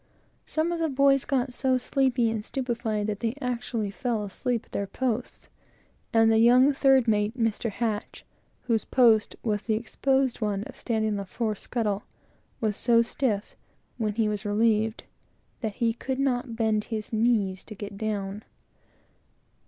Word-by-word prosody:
Some 315 Hz, +2 st, 0 dB
of 340 Hz, -, -2 dB
the 325 Hz, -1 st, +1 dB
boys 275 Hz, 0 st, +3 dB
got 260 Hz, -2 st, 0 dB
so 260 Hz, 0 st, +1 dB
sleepy 250 Hz, -2 st, +1 dB
and 220 Hz, -2 st, -3 dB
stupefied, 235 Hz, -4 st, -2 dB
that 205 Hz, -1 st, -3 dB
they 230 Hz, +1 st, -1 dB
actually 240 Hz, -5 st, -2 dB
fell 230 Hz, -1 st, -2 dB
asleep 230 Hz, +4 st, -2 dB
at -, -, -29 dB
their 200 Hz, -, -2 dB
posts; 250 Hz, +1 st, -3 dB, 0.6 s
and 225 Hz, 0 st, +5 dB
the 220 Hz, -, +4 dB
young 250 Hz, +5 st, +6 dB
third 270 Hz, -3 st, +4 dB
mate, 210 Hz, 0 st, +2 dB
whose 225 Hz, -4 st, 0 dB, 1.3 s
station 230 Hz, -4 st, +4 dB
was 210 Hz, -3 st, 0 dB
the 220 Hz, -1 st, 0 dB
exposed 265 Hz, +3 st, 0 dB
one 205 Hz, -2 st, -1 dB
of -, -, -10 dB
standing 220 Hz, -2 st, -1 dB
on 205 Hz, -, -1 dB
the 200 Hz, -, -4 dB
fore 220 Hz, +3 st, -2 dB
scuttle, 210 Hz, -1 st, -2 dB, 0.6 s
was 215 Hz, -2 st, 0 dB
so 235 Hz, -1 st, +4 dB
stiff, 230 Hz, -4 st, -2 dB, 0.4 s
when 215 Hz, -2 st, -1 dB
he 225 Hz, -1 st, +2 dB
was 210 Hz, -1 st, -2 dB
relieved, 220 Hz, +1 st, +1 dB, 0.6 s
that 220 Hz, -4 st, -3 dB
he 230 Hz, -2 st, +1 dB
could 260 Hz, +3 st, -4 dB
not 250 Hz, -3 st, 0 dB
bend 220 Hz, -2 st, +1 dB
his 220 Hz, -1 st, -5 dB
knees 215 Hz, -4 st, +1 dB
to 215 Hz, -, -9 dB
get 200 Hz, 0 st, -7 dB
down. 205 Hz, -1 st, -3 dB
225 Hz, 155 wpm, -27 LUFS, 210-250 Hz, 1.3 s, young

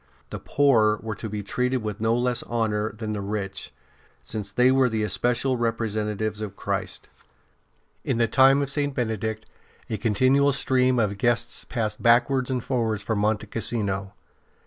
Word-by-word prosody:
The -, -, -5 dB
poor 115 Hz, -7 st, +3 dB
were 110 Hz, -1 st, -3 dB
to 110 Hz, +2 st, -7 dB
be 105 Hz, 0 st, -4 dB
treated 125 Hz, +3 st, -1 dB
with 105 Hz, -1 st, -5 dB
no 115 Hz, +1 st, +2 dB
less 125 Hz, 0 st, 0 dB
honour 110 Hz, -2 st, -1 dB
than 110 Hz, 0 st, -5 dB
the 105 Hz, -, -3 dB
rich, 100 Hz, -1 st, -4 dB, 0.5 s
since 105 Hz, -3 st, -5 dB
they 125 Hz, +5 st, +3 dB
were 130 Hz, -1 st, +3 dB
the 110 Hz, -2 st, -1 dB
especial 125 Hz, +4 st, 0 dB
representatives 110 Hz, -2 st, -2 dB
of 100 Hz, -2 st, -5 dB
Christ. -, -, -4 dB, 1.0 s
In -, -, -1 dB
the 115 Hz, -1 st, +3 dB
time 135 Hz, +4 st, +5 dB
of 140 Hz, -, -3 dB
St. 145 Hz, -1 st, -1 dB
Benedict 110 Hz, -2 st, -2 dB, 0.5 s
a 110 Hz, -, -1 dB
continual 130 Hz, +6 st, +3 dB
stream 130 Hz, -1 st, +2 dB
of 105 Hz, -3 st, 0 dB
guests 120 Hz, 0 st, 0 dB
passed 110 Hz, -4 st, -3 dB
backwards 125 Hz, +2 st, +3 dB
and 125 Hz, -3 st, -1 dB
forwards 110 Hz, -5 st, -1 dB
from 110 Hz, 0 st, -1 dB
Monte 105 Hz, 0 st, 0 dB
Cassino. 100 Hz, -4 st, -2 dB
115 Hz, 160 wpm, -25 LUFS, 105-125 Hz, 1.0 s, time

